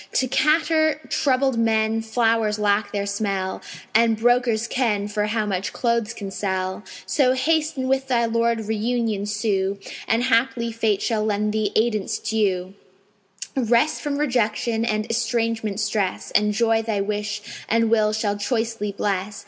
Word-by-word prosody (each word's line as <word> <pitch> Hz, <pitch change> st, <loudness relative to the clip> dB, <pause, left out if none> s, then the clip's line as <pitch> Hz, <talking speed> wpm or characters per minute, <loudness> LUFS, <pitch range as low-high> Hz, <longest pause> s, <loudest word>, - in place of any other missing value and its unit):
To 260 Hz, -, +2 dB
catarrh 315 Hz, +3 st, +2 dB
troubled 265 Hz, -3 st, +1 dB
men 225 Hz, 0 st, +2 dB
flowers 225 Hz, -1 st, +1 dB
lack 205 Hz, 0 st, +1 dB
their 200 Hz, -1 st, -2 dB
smell; 200 Hz, -2 st, -2 dB, 0.3 s
And 225 Hz, 0 st, +4 dB
brokers 235 Hz, -1 st, +2 dB
ken 215 Hz, -6 st, 0 dB
for 210 Hz, 0 st, -1 dB
how 215 Hz, 0 st, 0 dB
much 195 Hz, -2 st, -2 dB
clothes 235 Hz, -1 st, 0 dB
can 200 Hz, -2 st, -6 dB
sell; 190 Hz, 0 st, -3 dB, 0.2 s
So 255 Hz, -3 st, +2 dB
haste 305 Hz, +3 st, +1 dB
and 260 Hz, 0 st, -1 dB
with 265 Hz, 0 st, 0 dB
thy 240 Hz, -3 st, +2 dB
Lord 230 Hz, 0 st, +1 dB
reunion 220 Hz, -1 st, -1 dB
sue, 205 Hz, -2 st, -1 dB, 0.3 s
And 230 Hz, +2 st, +2 dB
haply 235 Hz, -1 st, +1 dB
Fate 220 Hz, -3 st, 0 dB
shall 220 Hz, -3 st, 0 dB
lend 210 Hz, 0 st, 0 dB
thee 215 Hz, -2 st, 0 dB
aidance 215 Hz, -3 st, +1 dB
due, 190 Hz, -4 st, -1 dB, 0.8 s
Rest 245 Hz, +3 st, +2 dB
from 290 Hz, -2 st, -2 dB
rejection 235 Hz, -4 st, 0 dB
and 215 Hz, -2 st, 0 dB
estrangement 230 Hz, -2 st, -1 dB
stress, 210 Hz, -3 st, -1 dB
And 210 Hz, 0 st, +3 dB
Joy 225 Hz, +1 st, +2 dB
thy 220 Hz, -2 st, -2 dB
wish 210 Hz, +1 st, -3 dB, 0.3 s
and 230 Hz, 0 st, +2 dB
will 215 Hz, -2 st, +3 dB
shall 215 Hz, -1 st, -1 dB
choicely 225 Hz, -1 st, -2 dB
bless. 200 Hz, 0 st, -2 dB
220 Hz, 150 wpm, -23 LUFS, 210-235 Hz, 0.8 s, And